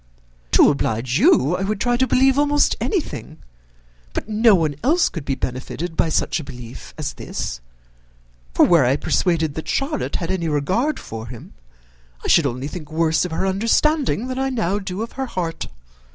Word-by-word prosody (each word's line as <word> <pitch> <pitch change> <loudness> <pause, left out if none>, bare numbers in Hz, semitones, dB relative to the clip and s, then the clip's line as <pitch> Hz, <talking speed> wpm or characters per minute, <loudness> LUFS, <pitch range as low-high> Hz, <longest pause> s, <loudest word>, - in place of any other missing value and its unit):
"To - - +7
oblige 120 -2 -1
you, 145 +7 +4
I - - -3
would 195 +1 -1
try 245 +2 +1
to 260 +2 +2
believe 265 +3 +3
almost 290 0 +3
anything, 320 - -3 0.8
but - - -3
no 220 0 +5
one 155 -5 0
else 325 +7 +3
could 165 -6 -7
be 135 - -1
benefited 135 +7 -4
by 160 - +2
such 160 - 0
a - - -6
belief 125 -3 -10
as - - -3
this; - - -5 0.9
for - - +6
were 170 -5 +5
I 130 +2 +3
persuaded 160 0 0
that 160 - -6
Charlotte 280 +2 -1
had 165 - -2
any 175 -3 -1
regard 190 - 0
for 110 0 -7
him, 120 -1 -11 0.7
I - - -4
should - - +5
only 125 +3 -4
think 155 -1 -8
worse 160 +1 +2
of 180 - -5
her 160 - -1
understanding 230 +6 +1
than 255 0 -3
I 270 0 0
now 205 -6 -1
do 190 +1 -4
of 230 - -7
her 265 0 -4
heart. 170 -7 -4
180 Hz, 180 wpm, -21 LUFS, 150-245 Hz, 0.9 s, To